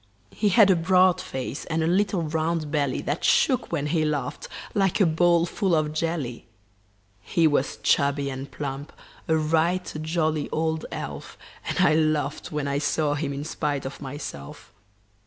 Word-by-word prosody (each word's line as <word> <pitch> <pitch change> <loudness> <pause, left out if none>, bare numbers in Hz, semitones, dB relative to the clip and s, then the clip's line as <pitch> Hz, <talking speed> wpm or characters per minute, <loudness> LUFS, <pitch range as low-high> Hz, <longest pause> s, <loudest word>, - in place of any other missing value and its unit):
He 210 - +1
had 200 -1 +6
a - - +5
broad 180 +1 +3
face 130 +1 -5
and 160 0 -1
a - - +1
little 190 +1 +1
round 160 0 -1
belly 145 -4 0
That 145 - -2
shook 255 -3 +2
when 150 -4 -1
he 155 +1 +1
laughed 150 -2 -2 0.3
like 195 -1 +1
a 195 - +5
bowl 170 +1 +3
full 185 0 0
of 155 -1 0
jelly. 155 -7 -3 0.7
He 165 - +1
was 145 -3 +1
chubby 140 0 +2
and 135 +1 -6
plump 140 +1 -6 0.3
a 160 - +3
right 165 +4 +1
jolly 155 -2 -1
old 160 0 -1
elf - - -7 0.3
And - - -2
I 155 - +5
laughed 155 -2 0
when 150 -2 -2
I 140 0 0
saw 150 0 0
him, 145 -1 -2
in 140 +1 -4
spite 150 -3 -2
of 135 - -7
myself. 130 - -8
155 Hz, 165 wpm, -25 LUFS, 145-170 Hz, 0.7 s, had